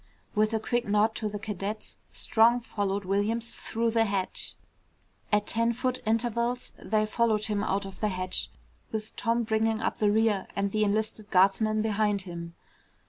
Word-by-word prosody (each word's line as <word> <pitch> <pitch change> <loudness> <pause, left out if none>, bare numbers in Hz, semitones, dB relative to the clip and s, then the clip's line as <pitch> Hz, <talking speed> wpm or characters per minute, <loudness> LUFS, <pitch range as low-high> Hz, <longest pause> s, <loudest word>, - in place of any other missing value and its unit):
With 215 0 +2
a 220 - +1
quick 240 +1 -1
nod 210 +2 +3
to 215 - -2
the 205 - -4
cadets 210 0 -5
Strong 235 +2 +3
followed 200 -4 -2
Williams 215 +5 0
through 230 0 -1
the 225 0 +3
hatch. 195 -3 -2 0.8
At 210 0 +3
ten 230 +1 +2
foot 255 +1 -1
intervals 235 +2 0
they 215 +1 +1
followed 215 -1 +1
him 205 -1 -1
out 195 -1 0
of 195 -1 -9
the 215 - +1
hatch, 185 -1 -2 0.4
with 215 -1 -5
Tom 235 +1 +1
bringing 220 0 +1
up 225 - -2
the 210 - +3
rear 215 -2 +2
and 200 0 0
the 215 +1 +2
enlisted 215 0 -1
guardsman 215 +3 +3
behind 210 -2 +1
him. 170 -2 -7
215 Hz, 165 wpm, -28 LUFS, 200-225 Hz, 0.8 s, nod